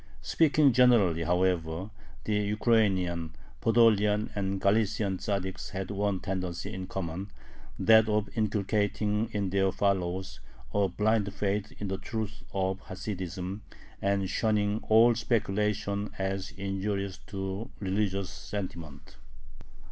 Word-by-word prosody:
Speaking 150 -3 +4
generally, 110 -10 +4
however, 90 +1 0 0.3
the 110 - -1
Ukrainian, 100 -6 +1 0.3
Podolian, 110 -2 +4
and 100 -1 -2
Galician 100 -1 +1
Tzaddiks 95 -2 -3
had 95 0 -4
one 100 -1 0
tendency 95 0 -3
in 95 -1 -5
common, 95 +1 -4 0.5
that 110 0 +6
of 105 0 +1
inculcating 105 0 0
in 100 -3 -1
their 95 0 +2
followers 95 -1 -1 0.3
a 100 -1 +3
blind 105 +2 +1
faith 100 +1 -2
in 105 - -4
the 95 0 -3
truths 110 0 -5
of 95 0 -1
Hasidism 95 0 -5 0.4
and 100 -1 +1
shunning 105 +1 +1
all 115 +2 +7
"speculation" 105 -3 0
as 95 0 -2
injurious 100 0 -3
to 95 +2 -4
religious 100 -1 -1
sentiment. 80 -8 -7
100 Hz, 110 wpm, -29 LUFS, 95-105 Hz, 0.5 s, all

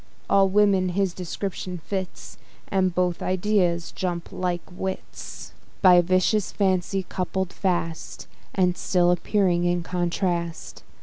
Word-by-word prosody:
All 195 -1 +5
women 195 -2 +3
his 190 0 0
description 185 0 -4
fits, 185 +2 -6 0.3
And 185 -2 +1
both 180 -1 0
ideas 185 -3 +1
jump 175 -2 -3
like 180 -1 -2
wits; 190 +1 -6 0.3
By 180 -2 +8
vicious 185 +3 +1
fancy 190 -1 0
coupled 185 0 -2
fast, 175 -4 -2 0.3
And 180 -2 +2
still 175 -1 +2
appearing 180 -1 +1
in 175 0 +1
contrast. 175 -1 -2
180 Hz, 115 wpm, -25 LUFS, 175-190 Hz, 0.3 s, By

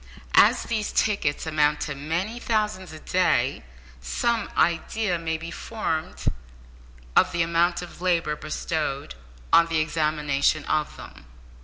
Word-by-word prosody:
As - - +6
these 215 -2 -2
tickets 180 -10 0
amount 150 -1 +2
to 145 - -2
many 170 +11 -3
thousands 210 -5 -1
a 155 - -9
day, 155 - +1 0.4
some 205 - 0
idea 175 +2 +1
may 160 -1 -2
be 165 +1 -7
formed 165 -7 -4 0.9
of - - +5
the 170 -1 +1
amount 170 +1 +1
of 175 0 -11
labour 170 -4 +1
bestowed 150 - -3 0.4
on 170 - +7
the 165 -1 0
examination 150 -2 +1
of 155 -1 -1
them. - - -12
165 Hz, 130 wpm, -25 LUFS, 150-185 Hz, 0.9 s, on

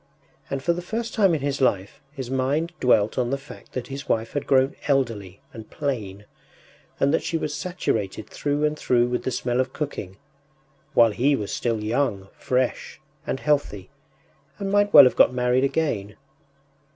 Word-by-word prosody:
” - - -34
And 135 -1 -3
for 170 - +2
the 175 - -5
first 225 +6 -4
time 195 -6 +3
in 150 - -3
his 140 -1 -2
life 100 -4 0
his 130 -3 -7
mind 140 +6 0
dwelt 110 -2 +2
on 120 -1 0
the 140 - 0
fact 140 - -14
that 130 - -4
his 135 +1 -7
wife 115 0 0
had 145 - -3
grown 135 0 +3
elderly 115 -9 -1
and 110 -1 -10
plain, 105 -9 -4 0.7
and 140 +2 +2
that 165 - +2
she 165 - -2
was 150 -2 -3
saturated 110 - -3
through 145 +1 -1
and 150 0 0
through 120 -1 +2
with 125 - -2
the - - +1
smell 125 0 -1
of 130 - -1
cooking, 100 -11 -5 0.8
while 115 -3 +6
he 135 +7 +2
was 105 -6 -4
still 115 -3 -1
young, 110 -4 -1
fresh, 130 0 -2 0.3
and 135 - -2
healthy, 140 -11 -1 0.7
and 195 -1 -3
might 205 0 +3
well 145 - +11
have 130 - +3
got 125 - +4
married 125 +1 +2
again. 125 -9 -1
130 Hz, 180 wpm, -24 LUFS, 115-145 Hz, 0.8 s, well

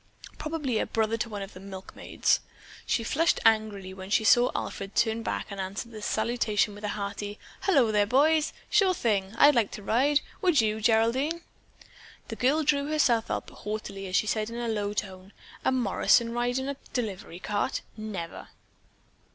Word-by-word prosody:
"Probably 300 -7 -1
a - - -1
brother 220 0 0
to 230 +1 -2
one 205 -2 -5
of 195 - -10
the - - -11
milkmaids." 190 0 -1 0.5
She 230 - +1
flushed 325 +9 +2
angrily 215 -4 +2
when 190 0 -9
she 215 - +3
saw 240 +3 +5
Alfred 195 0 -4
turn 225 0 +2
back - - -3
and 200 -1 -4
answer 195 +5 -5
the 220 -2 -9
salutation 220 -1 0
with 205 +1 -12
a - - -1
hearty, 205 +1 -4 0.3
"Hullo 275 - +4
there, 205 -1 +3
boys. 300 +6 +3 0.2
Sure 390 -3 +3
thing, 205 -5 0
I'd 290 +4 +7
like 235 -6 +2
to 210 - -7
ride! 275 +8 +3 0.2
Would 355 -6 +4
you, 220 -1 +1
Geraldine?" 235 +9 +2 0.9
The 225 - -4
girl 280 +7 +2
drew 285 -1 +2
herself 250 -7 +2
up - - -3
haughtily 210 -2 -6
as 185 - -3
she - - +3
said 215 +1 -1
in 230 - -7
a 240 0 -2
low 210 -2 -2
tone: 190 -1 -5 0.3
"A - - +2
Morrison 235 -1 +3
ride 245 +1 0
in 265 0 -2
a 280 -1 -3 0.2
delivery 205 -8 -4
cart? 205 +2 -2
Never." 210 -6 -6
220 Hz, 175 wpm, -28 LUFS, 205-255 Hz, 0.9 s, I'd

